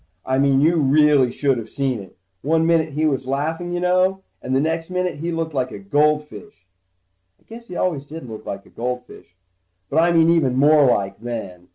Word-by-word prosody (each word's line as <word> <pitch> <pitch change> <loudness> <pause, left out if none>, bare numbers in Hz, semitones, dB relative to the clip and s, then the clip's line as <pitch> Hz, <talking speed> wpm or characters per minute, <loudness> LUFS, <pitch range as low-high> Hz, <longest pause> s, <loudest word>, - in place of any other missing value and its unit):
I 130 0 0
mean 135 -1 +3
you 165 +3 +3
really 145 -3 +4
should 135 -2 0
of 110 -1 -8
seen 135 -3 -2
it. 95 -2 -13 0.2
One 160 +2 +1
minute 165 -2 +1
he 155 +2 0
was 135 -4 -1
laughing 160 +6 -2
you 175 - -2
know, 185 +2 +1 0.2
and 130 +1 -2
the - - +3
next 165 +3 -2
minute 180 -3 -2
he 170 +2 -3
looked 165 -1 -3
like 130 -2 -1
a - - -8
goldfish. 150 - -1 0.7
I - - -32
guess 235 +1 -12
he 180 - -8
always 150 -7 -2
did 155 -3 -9
look 110 -2 -9
like 100 0 -7
a - - -20
goldfish, 125 -7 -6 0.6
but 155 - +2
I 170 +1 +3
mean 165 -1 +4
even 140 -7 +2
more 145 +2 +5
like, 100 -1 -2
then. 100 -7 -7
150 Hz, 205 wpm, -21 LUFS, 130-165 Hz, 0.7 s, more